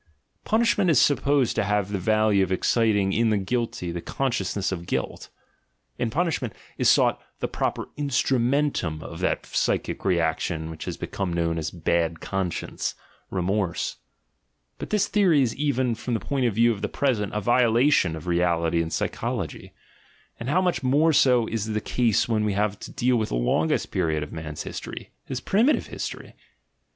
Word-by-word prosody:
Punishment 220 -4 +2
is 155 - +5
supposed 140 -3 +2
to - - +1
have 105 -1 0
the 100 - -1
value 110 +1 +3
of 95 - -3
exciting 105 0 +2
in 115 0 +2
the 105 - +2
guilty 100 -3 -2
the 85 0 -4
consciousness 100 -7 -1
of 85 -2 -5
guilt; - - -3 0.7
in 120 - 0
punishment 145 - -1 0.2
is - - +3
sought - - +3 0.2
the - - -1
proper - - -2
instrumcntum 130 - 0
of 85 - -8
that 95 - -1
psychic - - -1
reaction 80 -2 0
which 80 0 -8
becomes 95 -4 -3
known 85 -1 0
as 80 - -3
a - - -14
"bad 85 0 0
conscience," 95 -4 -3 0.3
"remorse." 95 -1 -1 0.8
But - - -6
this 205 -1 +2
theory 180 -9 +4
is 115 -3 -1
even, 130 -4 0
from 115 +1 -3
the - - 0
point 135 -3 0
of 110 - -2
view 115 +2 +4
of 105 -3 -4
the 105 - -2
present, 115 -8 0
a - - +1
violation 120 - +3
of 80 - -9
reality 85 -1 +1
and 80 0 -4
psychology: - - -3 0.7
and 115 - -4
how 180 +6 +3
much 175 -9 0
more 145 +5 +3
so 125 -4 +4
is 110 -1 -3
the 110 -1 -1
case 115 0 +1
when 110 -2 +1
we 105 -1 0
have 105 0 0
to - - -9
deal 125 0 +1
with 110 -2 -1
the - - -2
longest - - +1
period 80 -2 0
of 75 - -9
man's 80 -2 -6
history, - - -7
his 130 - -4
primitive 230 - +2
history! - - -7
110 Hz, 170 wpm, -25 LUFS, 90-130 Hz, 0.8 s, is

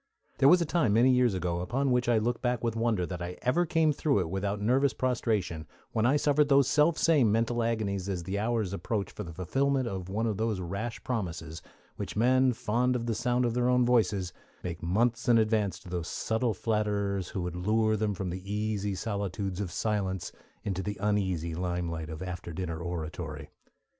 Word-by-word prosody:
There 135 0 +7
was 180 - +7
a - - -3
time 150 -9 +2
many 120 +4 +5
years 125 -5 +3
ago, 85 -1 -1
upon 130 +10 0
which 125 -1 +2
I 120 - +4
look 120 +2 0
back 125 -2 0
with 115 -1 0
wonder 115 -5 +1
that 90 -1 -6
I 90 +1 -5
ever 170 +8 +2
came 160 -1 +3
through 140 -7 +1
it 85 -2 -4
without 100 +1 -1
nervous 130 +6 +2
prostration, 105 - -1 0.2
when 110 +1 +2
I 135 - +4
suffered 145 0 +3
those 140 -2 +5
selfsame 155 -2 +4
mental 115 +2 +1
agonies 100 -4 -1
as 90 -3 -2
the 95 +4 -2
hour 115 +1 +1
approached 100 +1 -2
for 105 - -6
the 85 - -8
fulfilment 135 - 0
of 95 -3 -5
one 110 +4 -1
of 110 -4 -1
those 110 -2 -1
rash 100 +6 -4
promises 85 -9 -4 0.4
which - - -5
men 130 +4 +4
fond 125 +2 0
of 120 -1 -2
the 115 - 0
sound 125 +2 +1
of 120 - 0
their 125 +1 +1
own 125 -1 +4
voices 105 -7 +2 0.3
make 85 -2 -5
months 115 +8 +1
in 120 - +6
advance 110 -3 +1
to - - -15
those 85 -2 -3
subtle 110 -1 -1
flatterers 100 -3 -1
who 95 - -4
would 90 0 -4
lure 110 +4 +2
them 105 -1 -1
from 95 -1 -3
the 95 +3 -6
easy 105 -1 -1
solitudes 100 -2 -3
of 95 -4 -4
silence 95 -1 -2 0.3
into 95 -2 -2
the 105 +1 -4
uneasy 95 -5 0
limelight 85 -2 -3
of 80 +2 -6
after 90 -2 -6
dinner 85 -1 -4
oratory. 80 -2 -5
105 Hz, 200 wpm, -29 LUFS, 90-120 Hz, 0.4 s, There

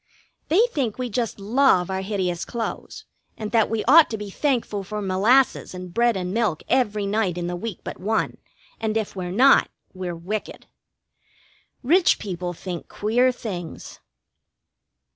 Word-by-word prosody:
They 350 +7 +4
think 250 - -2
we 250 -2 -3
just 230 -1 -2
love 205 -4 +3
our 190 0 -2
hideous 190 -3 -2
clothes, 235 -2 -5 0.3
and 215 -2 -5
that 225 -2 +3
we 225 -1 -1
ought 330 -1 +7
to 220 - -3
be 205 -1 -7
thankful 235 -6 -1
for 210 +2 -5
molasses 205 +4 +2
and 180 -1 -8
bread 235 -1 +2
and 180 0 -3
milk 215 -8 0
every 215 -5 +1
night 200 -3 0
in 175 - -3
the 175 0 -3
week 200 +1 -6
but - - -7
one, 215 +4 -1 0.4
and 220 -1 -1
if 215 -2 -3
we're 180 -2 -4
not, 255 +9 +5 0.2
we're 185 -2 -5
wicked. 195 +6 -5 1.2
Rich 340 +8 +4
people 180 -3 -4
think 175 0 -7
queer 245 +5 +2
things. 185 -9 -7
210 Hz, 155 wpm, -23 LUFS, 185-235 Hz, 1.2 s, ought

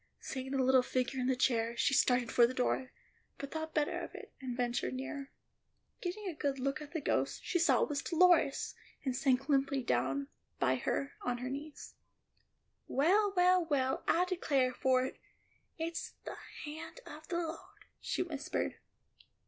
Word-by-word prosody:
Seeing 265 0 -5
the 270 -1 +1
little 260 0 +6
figure 255 +1 -1
in 250 - 0
the 260 - +3
chair, 235 -2 +1
she 280 - +2
started 250 -2 +3
for 240 -1 +6
the 255 - -6
door, 255 +1 0 0.5
but 280 0 -6
thought 315 0 -4
better 300 -1 +1
of - - -7
it, - - -10
and 250 -2 -4
ventured 245 +1 -1
nearer. 275 +1 -5 0.7
Getting 385 +3 -4
a 360 - -2
good 285 -2 -1
look 275 +3 -1
at 295 -1 -9
the 330 - -2
ghost, - - 0
she 350 - 0
saw 335 - +4
it - - -1
was 285 -1 -1
Dolores, 335 -5 +4 0.3
and 260 -2 0
sank 270 0 +2
limply 275 -2 +2
down 135 - 0 0.3
by 130 -1 +3
her 275 - -1
on 245 -1 -1
her 250 +1 -4
knees. 290 +2 -7 0.9
"Well, 390 +9 +3
well, 360 0 +5
well, 275 -5 0
I 355 +2 +4
declare 280 -8 +1
for 255 0 +2
it, - - -7 0.6
it's 330 0 -4
the - - -6 0.3
hand 315 +10 -7
of 310 +1 -10
the 345 - -1
Lord," 330 -1 -6
she - - -1
whispered. 305 -5 -3
275 Hz, 175 wpm, -33 LUFS, 255-315 Hz, 0.9 s, little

